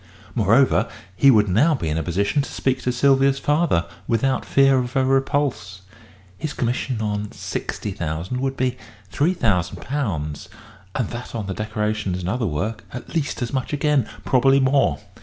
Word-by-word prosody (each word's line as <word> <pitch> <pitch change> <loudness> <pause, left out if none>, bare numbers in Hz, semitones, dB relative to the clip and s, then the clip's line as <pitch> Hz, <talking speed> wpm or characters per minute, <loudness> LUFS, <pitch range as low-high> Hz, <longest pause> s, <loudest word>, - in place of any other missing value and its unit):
Moreover, 115 +4 +3 0.3
he 140 - +5
would 105 -5 +5
now 135 - +3
be 85 - -3
in 75 - -1
a - - -1
position 100 - 0
to 140 - -6
speak 130 -1 -1
to 125 - 0
Sylvia's 135 +1 +3
father 145 - +1 0.2
without 130 +3 +1
fear 135 -1 +4
of 125 +1 -4
a 135 -1 +3
repulse. 135 -8 0 0.6
His 155 - -3
commission 120 -1 -2
on 105 -1 -2
£60,000 90 +1 -4
would 135 0 -2
be 130 -1 0 0.4
£3,000, 95 - -1 0.5
and 125 -6 0
that 120 0 -7
on 110 -3 -3
the 95 - -3
decorations 105 -2 -2
and 90 - -3
other 115 +2 0
work 105 +8 -3
at 125 - -8
least 150 -6 -1
as 120 - -4
much 130 +2 -2
again 145 -4 +1 0.2
probably 135 +1 +4
more. 135 +1 +3
125 Hz, 160 wpm, -22 LUFS, 100-135 Hz, 0.6 s, he